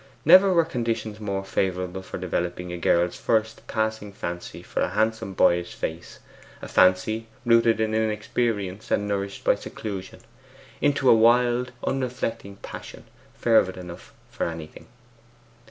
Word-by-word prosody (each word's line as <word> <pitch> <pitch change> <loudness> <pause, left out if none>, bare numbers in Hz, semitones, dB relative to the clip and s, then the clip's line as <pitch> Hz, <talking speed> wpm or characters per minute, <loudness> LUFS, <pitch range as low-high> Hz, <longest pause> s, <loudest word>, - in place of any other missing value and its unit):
Never 190 +1 +8
were 170 -2 +4
conditions 115 -6 -3
more 100 -2 -3
favourable 95 -1 -2
for 95 - -7
developing 90 0 -3
a - - -4
girl's 85 +1 +2
first 110 0 -1
passing 110 -2 -2
fancy 85 -2 -6
for - - -3
a - - +1
handsome 110 -2 -1
boyish 85 0 +2
face 80 +2 -5 0.4
a - - -8
fancy 95 +5 +3 0.2
rooted 115 -1 +4
in 110 0 0
inexperience 110 -2 -1
and 105 - +1
nourished 100 -1 -3
by - - +4
seclusion 95 -3 -7 0.6
into 145 -2 +2
a - - +9
wild 120 +2 +3
unreflecting 120 -6 -3
passion - - -9 0.3
fervid 110 -6 +3
enough 90 -2 -10 0.2
for - - -2
anything. 80 -2 -8
105 Hz, 135 wpm, -25 LUFS, 90-115 Hz, 0.6 s, a